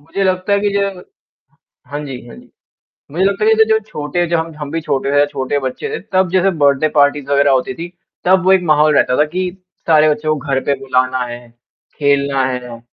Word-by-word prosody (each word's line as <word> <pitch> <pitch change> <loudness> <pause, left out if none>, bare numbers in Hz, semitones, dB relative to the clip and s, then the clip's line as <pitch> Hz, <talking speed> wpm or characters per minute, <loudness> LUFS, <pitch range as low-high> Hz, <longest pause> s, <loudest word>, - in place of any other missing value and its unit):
मुझे 165 +7 -4
लगता 185 +1 0
है 200 - +4
कि 205 0 0
ज 195 -2 -2 0.9
हाँ 145 - -5
जी, 125 -3 -8
हाँ - - -11
जी। - - -16 0.6
मुझे 175 +5 0
लगता 200 +2 +1
है 220 - +4
कि 220 - +5
जै 220 - +6
जो 220 0 +3
छोटे 175 -1 -2
ज - - -8
हम 165 0 -1
हम 150 -2 -6
भी 165 +2 -2 0.2
रहे 140 +1 +1
या 145 - +5
छोटे 140 0 -2
बच्चे 130 - -4
थे, 450 - -3
तब 185 -2 0
जैसे 190 +1 +2
बर्थडे 145 +1 +3
पार्टीज़ 145 -1 +3
वग़ैरह 140 0 +3
होती 130 -1 0
थी, 170 +1 -7 0.4
तब 185 0 +3
वो 190 - +5
एक 190 -1 +4
माहौल 155 -2 +3
रहता 125 - +2
था 150 - +5
कि 180 +4 -3 0.4
सारे 155 -1 +5
बच्चों 155 +1 0
को 155 - -11
घर 135 -1 0
पे 140 - +1
बुलाना 130 -1 0
है, 120 0 -7 0.6
खेलना 140 -2 +1
है, 125 -2 -5
150 Hz, 225 wpm, -16 LUFS, 140-185 Hz, 0.9 s, जै